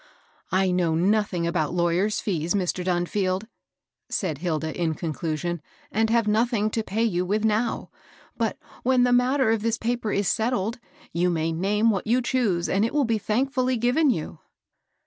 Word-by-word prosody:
" - - -35
I 185 0 +2
know 175 -3 +1
nothing 190 0 +1
about 170 -1 -1
lawyers' 175 +4 +1
fees, 175 -2 -1
Mr. 185 -1 -1
Dun 175 -1 +1
field," 190 +1 -1 0.6
said 160 -8 -2
Hilda, 160 -2 -2
in 165 -2 -1
conclusion, 165 +1 -3
^* - - -21 0.3
and 220 +1 +1
have 230 -1 +2
noth 225 +3 +2
ing 215 -1 +1
to 225 - 0
pay 220 +1 -1
you 180 -6 +1
with 210 +4 0
now; 220 +2 0 0.4
but, - - -1 0.2
when 255 -1 +3
the 245 0 +3
matter 250 0 +3
of 225 -2 +1
this 230 +1 0
paper 235 -2 -2
is 200 -1 0
settled, 225 0 0 0.3
you 175 +1 +2
may 165 -1 0
name 205 +7 +2
what 195 0 -2
you 240 +3 +3
choose 215 -10 +1
and 195 +2 +1
it 230 - -1
will 290 -2 +3
be 225 -2 0
thankfully 255 +4 0
given 250 +7 +3
you." 165 -11 -2
205 Hz, 185 wpm, -25 LUFS, 175-230 Hz, 0.6 s, when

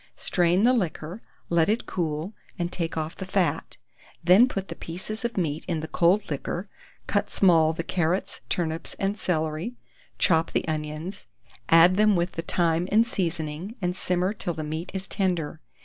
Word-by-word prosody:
Strain 175 +2 +2
the 250 +2 +6
liquor, 180 -3 -2 0.3
let 170 +1 +3
it 225 +3 +1
cool, 160 +2 -2 0.2
and 175 -1 -2
take 165 -2 -3
off 160 +1 -3
the - - -6
fat; 185 -2 0 0.5
then 185 +8 +7
put 195 -6 -4
the - - -6
pieces 190 +7 -6
of 235 -2 -2
meat 160 -4 -1
in 165 -4 -1
the 160 - -5
cold 180 +3 +2
liquor; 175 +6 -3 0.4
cut 205 - 0
small 165 -5 +4
the 165 +1 -4
carrots, 175 +2 -1
turnips, 165 -2 -2
and 200 +2 -2
celery; 160 +6 -1 0.4
chop 165 -2 +3
the - - 0
onions, 155 +4 -4 0.4
add 170 +3 +7
them 215 -1 +5
with 175 +1 0
the 165 - -4
thyme 170 0 +1
and 220 +2 +5
seasoning, 170 -1 -3
and 180 -2 -1
simmer 180 +2 0
till 175 -5 -3
the 155 - -4
meat 160 +4 -4
is 190 0 -3
tender. 175 -6 -1
175 Hz, 170 wpm, -26 LUFS, 160-195 Hz, 0.5 s, then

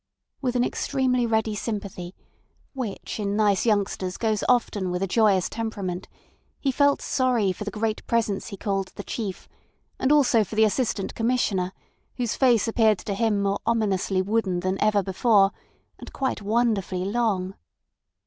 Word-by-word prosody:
With 250 -2 -1
an 245 - +3
extremely 250 -2 0
ready 220 -1 +1
sympathy, 200 -4 -5 0.6
which 235 -6 -5
in 200 -1 -1
nice 210 0 +2
youngsters 195 -3 0
goes 220 -3 0
often 215 -6 +1
with 180 +1 -2
a - - 0
joyous 200 -2 +3
temperament, 200 -5 -4 0.5
he 275 - 0
felt 285 +2 +2
sorry 250 -7 +1
for 210 +3 -6
the - - -2
great 215 +1 -3
Presence 220 -4 0
he 200 - -7
called 195 -1 -1
"The 200 - -6
Chief," 200 -4 -5 0.5
and 265 - +2
also 265 -7 +5
for 210 - -8
the 220 - +5
Assistant 215 -1 -1
Commissioner, 225 -6 0 0.5
whose 240 -4 -1
face 245 -4 +3
appeared 220 -2 +3
to 200 +3 -4
him 210 -1 +1
more 200 0 0
ominously 200 -4 +1
wooden 195 -3 0
than 185 +1 -2
ever 210 -2 +3
before, 195 +1 +3 0.5
and - - -10
quite 265 -5 -2
wonderfully 205 -4 0
long. 200 -4 0
210 Hz, 155 wpm, -25 LUFS, 195-235 Hz, 0.6 s, also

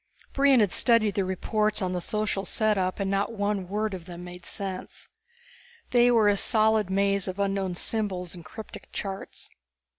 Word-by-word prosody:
Brion 275 -3 +5
had 205 -4 +1
studied 230 -4 +4
the 200 -1 0
reports 210 +3 0
on 185 -3 -1
the 180 - -2
social 210 +1 -1
setup 200 -2 0
and 195 -1 -1
not 200 +3 0
one 205 -3 -1
word 210 +2 -2
of 180 -3 -7
them 175 -1 -8
made 180 0 -10
sense. 190 -2 -6 0.8
They 245 0 +5
were 225 -3 +4
a 205 -1 +3
solid 215 -2 +3
maze 200 0 +1
of 185 0 -4
unknown 195 -2 -1
symbols 185 -3 -2
and 175 -2 -9
cryptic 220 +6 -10
charts. 195 -1 -6
200 Hz, 170 wpm, -27 LUFS, 185-215 Hz, 0.8 s, Brion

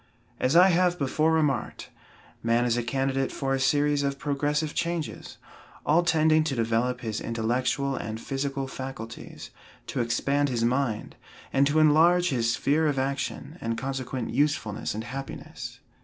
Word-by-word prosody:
As 130 +5 +1
I 180 +2 +8
have 180 0 +3
before 155 +3 +1
remarked, 150 -7 0 0.5
man 115 +1 +2
is 120 -1 +2
a 120 - +1
candidate 135 +2 -1
for 135 -1 -2
a 135 - 0
series 145 +1 +2
of 140 -1 -1
progressive 150 +2 -1
changes, 170 -2 -3 0.5
all 160 +4 +4
tending 160 -2 +3
to 145 -4 -1
develop 115 +2 0
his 110 -3 -3
intellectual 125 +4 -1
and 110 -3 -5
physical 135 +2 -3
faculties, 130 -4 -8 0.3
to - - -2
expand 140 +5 +1
his 120 -3 -1
mind, 125 -3 -1 0.4
and 140 +1 +4
to 145 +2 +1
enlarge 165 +4 +5
his 115 -3 +1
sphere 155 +3 +2
of 145 -2 0
action, 140 +5 -3
and 115 0 -2
consequent 130 -2 -3
usefulness 130 -8 0
and 110 - -4
happiness. 135 +3 -7
135 Hz, 150 wpm, -27 LUFS, 120-150 Hz, 0.5 s, I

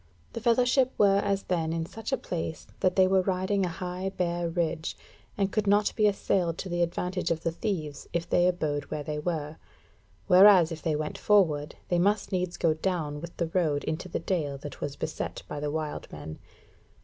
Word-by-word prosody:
The 230 - -5
fellowship 250 +2 +3
were 200 -1 +5
as 200 -1 0
then 165 -3 -1
in 165 0 -1
such 225 +8 -7
a 265 - +2
place, 165 -8 -4
that 185 -1 +2
they 190 - +6
were 190 0 +4
riding 190 +1 0
a 180 - 0
high 180 +2 -4
bare 175 -2 -1
ridge, 165 -2 -2 0.4
and 195 -1 +1
could 210 0 0
not 205 +1 +3
be 215 -2 +4
assailed 180 -4 0
to 190 - -5
the 175 0 -1
advantage 180 +2 -1
of 165 -1 -1
the 165 - 0
thieves 165 -6 -4
if 170 0 -2
they 175 0 +3
abode 150 -5 -1
where 150 - -4
they 150 0 -3
were; 155 -1 -3 0.7
whereas 185 -3 +7
if 160 -1 -6
they 160 -3 0
went 150 0 -3
forward, 160 -8 +3
they 175 -2 +2
must 205 +3 +1
needs 180 -2 -1
go 165 -2 +3
down 155 -3 -2
with 170 0 -9
the 165 -2 -2
road 155 -6 +1
into 170 +4 -3
the - - -2
dale 155 -6 -1
that 145 +1 -9
was 145 -1 -3
beset - - -4
by 150 - -5
the 145 0 -2
wild 155 0 -4
men. 80 0 -8
175 Hz, 200 wpm, -28 LUFS, 160-195 Hz, 0.7 s, whereas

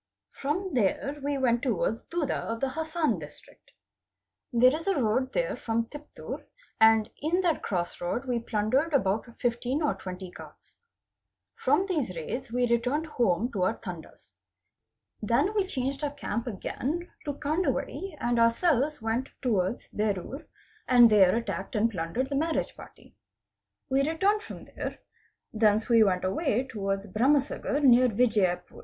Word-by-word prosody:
From 355 +7 -3
there 265 +5 0
we 285 0 -1
went 240 -3 +2
towards 225 -3 0
Duddu 335 -5 -2
of 230 0 -3
the 270 - 0
Hassan 315 +2 -1
District. - - -14 0.8
There 250 +3 +5
is 325 +4 -6
a 390 -7 +2
road 255 +3 +1
there - - 0
from 230 0 -1
Tiptur, 295 0 -8 0.4
and 220 0 +5
in 335 +5 +1
that 345 -4 +1
cross 175 -3 -3
road 205 +9 -2
we 245 -2 0
plundered 235 +8 0
about 210 -2 +1
15 245 +5 -1
or 295 - +2
20 185 -1 -8
carts. - - -14 0.7
From 295 +9 +2
these 300 - -2
raids 235 - -5
we 245 +1 +2
returned 250 +7 +1
home 235 - 0
to 195 - -3
our 190 +5 +1
Tandas. 175 -6 -10 0.9
Then 235 - +2
we 405 -3 +1
changed 270 -2 -3
our 295 - +1
camp 255 -5 -4
again 285 - -4
to 290 - -2
Kandwadi 320 +3 -2
and 240 0 +1
ourselves 275 +3 +2
went 230 +4 -1
towards 215 -4 0
Berur 210 - -3 0.4
and 240 -3 +7
there 195 -3 +6
attacked 210 -3 -3
and 225 +2 +2
plundered 195 +9 -2
the - - 0
marriage 320 +3 -1
party. - - -15 0.7
We 275 +2 +2
returned 395 +6 +2
from - - -9
there. - - -6 0.6
Thence 215 0 +2
we 230 -1 +6
went 185 -3 +1
away 245 - 0
towards 195 -5 -3
Bharamsagar 275 +6 +1
near 250 -1 +6
Vijiyapur. 210 -5 +1
245 Hz, 150 wpm, -28 LUFS, 215-290 Hz, 0.9 s, and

